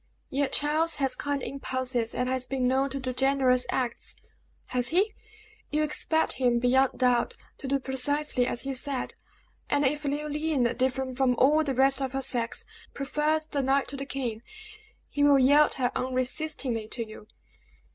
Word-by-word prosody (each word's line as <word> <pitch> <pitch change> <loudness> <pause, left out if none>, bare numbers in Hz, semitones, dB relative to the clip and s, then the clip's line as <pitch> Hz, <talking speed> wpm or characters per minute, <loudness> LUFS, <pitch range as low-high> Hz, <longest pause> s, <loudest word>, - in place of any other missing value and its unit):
"Yet 275 0 0
Charles 310 +3 +1
has 270 -2 0
kind 285 -2 -2
impulses, 260 -4 -2
and 250 - 0
has 255 0 0
been 260 -2 0
known 265 +2 +2
to 275 - -4
do 255 -1 -3
generous 255 -1 +2
acts." 245 -2 -2 0.6
"Has 245 -1 +2
he? 390 - +2 0.6
You 305 +1 +1
expect 315 +1 +1
him, 245 -2 +3
beyond 255 +2 +2
doubt, 250 -2 +2 0.2
to 275 - -5
do 275 +1 +2
precisely 265 0 0
as 240 - -2
he 275 0 -3
said; 265 0 -2 0.6
and 290 0 +2
if 295 +3 0
Leoline, 295 0 -1
different 260 0 -1
from 260 -2 +2
all 295 +6 +4
the 275 -3 -2
rest 270 +1 +3
of 265 -1 -2
her 270 0 -1
sex, 240 -3 -2 0.3
prefers 300 +3 0
the 285 -2 -1
knight 270 +1 +1
to - - -3
the 275 0 -5
king, 240 -6 -3 0.7
he 290 - -1
will 285 -1 +6
yield 285 +3 +5
her 250 -2 0
unresistingly 255 -2 -2
to 230 0 -4
you." 215 -1 -12
270 Hz, 165 wpm, -27 LUFS, 255-285 Hz, 0.7 s, will